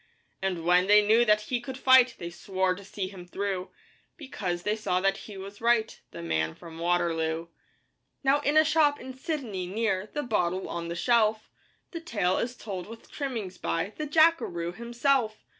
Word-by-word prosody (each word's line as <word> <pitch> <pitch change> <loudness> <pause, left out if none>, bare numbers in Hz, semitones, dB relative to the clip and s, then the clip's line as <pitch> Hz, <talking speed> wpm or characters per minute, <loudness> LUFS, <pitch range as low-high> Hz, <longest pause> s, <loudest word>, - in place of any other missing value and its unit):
And 180 -4 -2
when 180 +1 +4
they 210 0 +6
knew 225 +3 +5
that 210 -1 +4
he 240 +3 -2
could 260 +1 -7
fight 260 -2 +6
They 170 0 -6
swore 190 +1 -1
to 200 +2 -10
see 195 0 -4
him 185 -2 -11
through, 190 0 -3 0.5
Because 190 - -4
they 210 +1 0
saw 185 -4 0
that 195 +1 +2
he 200 - -8
was 200 +2 -9
right 230 -1 +1
The - - -9
Man 80 -1 -1
from 165 -1 -11
Waterloo. 165 -1 0 0.7
Now 275 +2 +4
in 290 +1 +1
a 310 - +7
shop 300 -2 +3
in 260 0 -8
Sydney, 255 - -4
near 205 0 -1
The 295 - -3
Bottle 185 -5 -1
on 170 0 -4
the 170 - -4
Shelf, 220 +1 +2 0.4
The 335 - -6
tale 200 - 0
is 245 +1 -3
told 190 -7 -6
with 230 +1 -12
trimmings 230 -10 -4
by 165 +5 -2
The 305 - -4
Jackaroo 300 - +3
himself. 235 0 0
210 Hz, 180 wpm, -28 LUFS, 180-245 Hz, 0.7 s, a